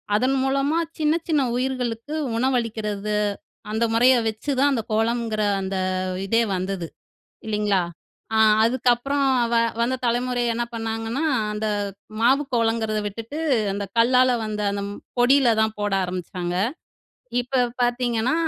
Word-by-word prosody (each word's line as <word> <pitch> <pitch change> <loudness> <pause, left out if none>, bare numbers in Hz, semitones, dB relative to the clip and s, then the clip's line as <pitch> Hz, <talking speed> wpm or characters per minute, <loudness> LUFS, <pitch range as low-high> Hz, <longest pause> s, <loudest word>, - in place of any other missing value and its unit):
அதன் 255 +5 +2
மூலமா 275 +4 +1 0.2
சின்ன 305 0 +3 0.2
சின்ன 295 -4 +3
உயிர்களுக்கு 255 +1 -2 0.2
உணவளிக்கிறது, 220 -5 -1 0.6
அந்த 220 +2 0
முறைய 250 +3 +5
வச்சுதான் 275 +5 0
அந்த 225 -4 -1
கோலம்ங்கிற 225 -1 0 0.2
அந்த 190 0 -3 0.5
இதே 230 +3 +3
வந்தது 185 -2 -3 0.6
இல்லைங்களா? 210 -3 +1 0.5
அ - - +3 0.3
அதுக்கப்புறம் 255 +4 +2 0.3
வ - - +3 0.3
வந்த 255 +2 +1
தலைமுறை 245 +1 0
என்ன 240 - -1
பண்ணாங்கன்னா, 225 +5 -2 0.3
அந்த 215 +1 -2 0.5
மாவு 265 +4 +4
கோலங்கிறத 225 -2 +1
விட்டுட்டு 230 +9 -6 0.3
அந்த 200 0 -3
கல்லால 250 +2 +5
வந்த 210 -1 -3
அந்த 200 0 -3 0.4
பொடியில 250 -1 +5
தான் 220 0 0
போட 205 -1 -1
ஆரம்பிச்சாங்க. 180 -1 -4 0.9
இப்ப 255 +1 -1 0.2
பார்த்தீங்கன்னா, 240 0 +1
230 Hz, 115 wpm, -23 LUFS, 215-255 Hz, 0.9 s, முறைய